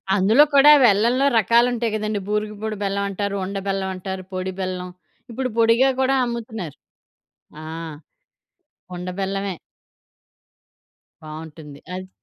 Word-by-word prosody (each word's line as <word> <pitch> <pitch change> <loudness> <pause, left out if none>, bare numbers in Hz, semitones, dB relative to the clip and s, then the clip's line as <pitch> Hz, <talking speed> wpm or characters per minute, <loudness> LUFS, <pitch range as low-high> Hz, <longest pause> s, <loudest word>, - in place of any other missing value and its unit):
అందులో 215 +9 +5
కూడా 285 +2 +8
వెల్లంలో 235 +6 +3
రకాలుంటాయి 235 +1 +2
గదండీ, 215 -1 -2
బూరుగుపూడి 210 0 -3
బెల్లమంటారు, 200 0 -2
ఉండ 200 +1 -6
బెల్లమంటారు, 190 -1 -3
పొడి 185 0 -3
బెల్లం, 185 -1 -4 0.4
ఇప్పుడు 255 +2 -2
పొడిగా 230 +4 +4
కూడా 265 +1 +2
అమ్ముతున్నారు. 225 - -6 0.9
ఆ! - - -9 1.3
ఉండ 180 +1 -6
బెల్లమే. 195 0 -2 1.7
బావుంటుంది. 155 -2 -10
అది 185 0 -7
200 Hz, 100 wpm, -22 LUFS, 185-230 Hz, 1.7 s, కూడా